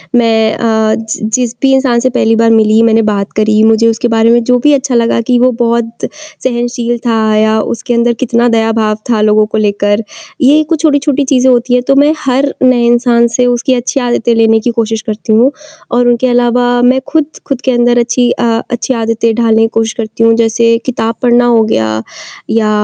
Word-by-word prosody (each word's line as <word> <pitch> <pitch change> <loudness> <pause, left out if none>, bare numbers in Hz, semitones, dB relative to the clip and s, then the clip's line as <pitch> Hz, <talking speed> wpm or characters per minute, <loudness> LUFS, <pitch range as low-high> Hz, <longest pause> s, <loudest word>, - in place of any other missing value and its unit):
मैं 225 -2 +2
अ, 220 -1 0
ज 225 -1 -6 0.2
जिस 245 -2 -2
भी 270 -1 +2
इंसान 260 -3 +1
से 255 +2 0
पहली 225 0 +2
बार 230 0 +2
मिली, 220 0 +3
मैंने 225 0 +2
बात 200 -1 -3
करी, 215 0 +2
मुझे 225 +1 +3
उसके 230 +1 0
बारे 225 0 +2
में 240 0 +3
जो 250 +1 +1
भी 295 - +4
अच्छा 270 -2 -1
लगा 230 0 +1
कि 250 - +3
वो 255 +1 +3
बहुत 235 0 -2 0.4
सहनशील 240 -1 -2
था 230 -1 0 0.2
या 220 +1 +1 0.2
उसके 245 +1 -4
अंदर 235 0 +1
कितना 240 -1 +1
दयाभाव 225 -1 0 0.2
था 220 -2 +1
लोगों 215 0 +2
को - - 0
लेकर, 205 0 0 0.4
ये 290 +4 +4
कुछ 330 -3 -1
छोटी-छोटी 285 -2 +1
चीज़ें 260 0 +3
होती 245 0 0
हैं 250 0 +1
तो 275 - +3
मैं 290 +2 +3
हर 270 +2 0
नए 255 -2 +3
इंसान 235 0 +2
से 250 - +2
उसकी 245 +2 0
अच्छी 255 +3 -2
आदतें 235 0 0
लेने 225 0 +3
की 235 +2 -2
कोशिश 225 0 -3
करती 215 +1 -3
हूँ 240 +5 +3 0.4
और 245 0 +1
उनके 240 +1 +1
अलावा 245 0 +1
मैं 255 +2 +3
खुद, 315 -2 0 0.2
खुद 275 -3 -3
के 260 - 0
अंदर 240 0 +2
अच्छी 240 +1 0
अ, - - -3 0.3
अच्छी 245 +2 -2
आदतें 230 -1 -1
ढालने 225 -1 +1
की 225 - +3
कोशिश 225 0 -1
करती 225 0 -3
हूँ 230 0 +4
जैसे 230 0 +1
किताब 230 -3 -2
पढ़ना 245 0 +2
हो 235 -2 +3
गया 110 - -1 0.5
या 220 -1 0
235 Hz, 205 wpm, -11 LUFS, 225-250 Hz, 0.5 s, भी